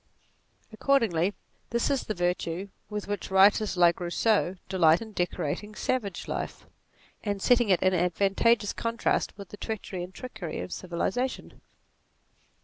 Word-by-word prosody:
Accordingly 210 -7 +2 0.3
this 235 +4 +1
is 275 - 0
the 215 - -3
virtue 175 +1 -1 0.2
with 210 -1 -4
which 205 0 -3
writers 195 +1 +4
like 175 0 +5
Rousseau 185 +2 +1
delight 170 -4 +4
in 225 -1 -8
decorating 190 +2 -2
savage 210 -8 -2
life, - - -4 0.6
and 205 -2 -2
setting 240 +1 +3
it 185 - +3
in 185 0 +4
advantageous 195 +5 +2
contrast 230 0 -1
with 200 -3 -9
the 205 - -10
treachery 205 -5 -5
and 180 - -8
trickery 220 -6 -6
of - - -6
civilization. 190 +8 -3
200 Hz, 135 wpm, -28 LUFS, 180-220 Hz, 0.6 s, like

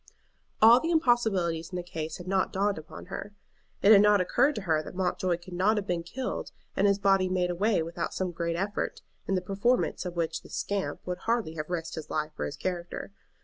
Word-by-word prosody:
All 230 +2 +9
the 325 - -2
impossibilities 220 - +2
in 185 - -7
the 180 - -3
case 160 -2 -5
had 180 - -10
not 190 0 +1
dawned 200 -2 0
upon 155 - -10
her. 205 0 -6 0.5
It 205 - +7
had 200 -2 +9
not 210 -1 +5
occurred 275 +10 +2
to - - -3
her 160 -4 +2
that 155 - -10
Mountjoy 180 -1 0
could 175 +1 -12
not 200 +5 +2
have 205 - -1
been 175 -3 -1
killed 250 +10 -4 0.2
and 200 - +3
his 200 -1 +3
body 195 -2 +3
made 180 -1 +1
away 195 0 +1
with 165 +1 -8
without - - -1
some 185 -1 -1
great 170 0 -2
effort, 195 +4 -2 0.2
in 195 - +1
the 185 - +1
performance 200 +7 0
of 180 -1 -5
which 165 -1 -1
the - - -15
"scamp" 200 -1 -2
would 180 0 -3
hardly 230 -8 0
have 155 0 -5
risked 165 -2 -3
his 160 -2 -6
life 155 0 -2
or - - 0
his - - -5
character. 175 +1 -4
185 Hz, 225 wpm, -28 LUFS, 170-205 Hz, 0.5 s, All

